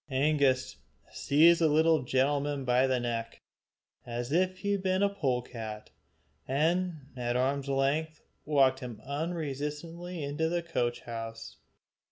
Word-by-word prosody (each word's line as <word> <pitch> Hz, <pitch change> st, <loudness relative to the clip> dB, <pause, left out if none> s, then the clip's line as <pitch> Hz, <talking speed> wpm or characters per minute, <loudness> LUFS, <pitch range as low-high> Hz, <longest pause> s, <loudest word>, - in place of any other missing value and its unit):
Angus 135 Hz, -1 st, +1 dB, 0.3 s
seized 165 Hz, +4 st, +4 dB
the 160 Hz, -, +5 dB
little 160 Hz, 0 st, +4 dB
gentleman 140 Hz, +2 st, 0 dB
by 125 Hz, +1 st, +3 dB
the 130 Hz, -1 st, +1 dB
neck, 115 Hz, -1 st, -3 dB, 0.6 s
as 120 Hz, +1 st, -5 dB
if 185 Hz, +3 st, +1 dB
he 200 Hz, +1 st, -2 dB
had 200 Hz, -1 st, 0 dB
been 185 Hz, +1 st, +1 dB
a 200 Hz, -, +4 dB
polecat, 125 Hz, -, -3 dB, 0.6 s
and 160 Hz, +2 st, 0 dB
at 120 Hz, -1 st, -2 dB
arm's 135 Hz, +2 st, 0 dB
length 145 Hz, +3 st, 0 dB, 0.2 s
walked 135 Hz, -3 st, +3 dB
him 120 Hz, -4 st, -7 dB
unresistingly 160 Hz, +3 st, -4 dB
into 145 Hz, +3 st, -1 dB
the 175 Hz, 0 st, -1 dB
coach 120 Hz, -8 st, -1 dB
house. 115 Hz, -1 st, -7 dB
140 Hz, 130 wpm, -30 LUFS, 125-165 Hz, 0.6 s, the